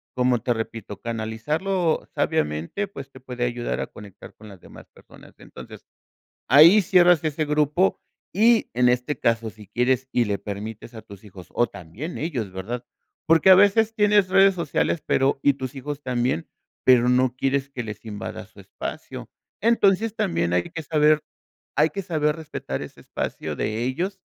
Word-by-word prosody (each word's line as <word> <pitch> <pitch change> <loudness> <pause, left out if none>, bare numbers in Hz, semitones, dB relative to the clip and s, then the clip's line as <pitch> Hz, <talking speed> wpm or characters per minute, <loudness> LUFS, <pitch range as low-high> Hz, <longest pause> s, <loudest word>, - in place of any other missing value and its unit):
como 125 -1 +2
te 120 +2 0
repito, 110 -3 -6
canalizarlo 150 - -2
sabiamente, 80 - -1
pues 140 -8 -10
te 130 - -14
puede 125 -1 -4
ayudar 120 0 -3
a - - -4
conectar 100 -2 -13
con 110 - -14
las 95 -4 -13
demás - - -14
personas. - - -17
Entonces, - - -12 0.6
ahí 165 +9 +7
cierras 175 -3 +4
ese 155 0 -1
grupo 150 +5 +1 0.4
y 225 +3 +4
en 125 0 +4
este 125 +4 -1
caso, 115 -1 0
si 105 0 -13
quieres 130 +1 0
y 120 -2 +2
le 100 -1 -1
permites 105 +3 -7
a 110 - -9
tus 100 -2 -14
hijos, 95 -4 -12
o 120 - +2
también 100 - -8
ellos, 125 - -3
¿verdad?, 115 +7 -5 0.4
porque 165 +3 +5
a 185 - +11
veces 210 +3 +4
tienes 210 -3 +3
redes 195 0 +5
sociales, 170 -1 -1
pero 135 0 +1
y 140 - +4
tus 130 0 -6
hijos 145 +2 -6
también, 125 - -1 0.4
pero 125 -1 +5
no 125 0 +2
quieres 135 +1 -1
que 130 -3 -5
les 110 0 -8
invada 105 -2 -7
su - - -17
espacio. - - -8 0.3
Entonces, 220 -1 +2
también 85 - -1
hay 90 0 +2
que 165 - -6
saber 150 0 +2 0.5
hay 155 +2 +3
que 195 - -4
saber 155 -4 0
respetar 160 -2 -6
ese - - -10
espacio - - -5
de 110 +2 -2
ellos 180 +10 -2
130 Hz, 170 wpm, -23 LUFS, 115-165 Hz, 0.6 s, a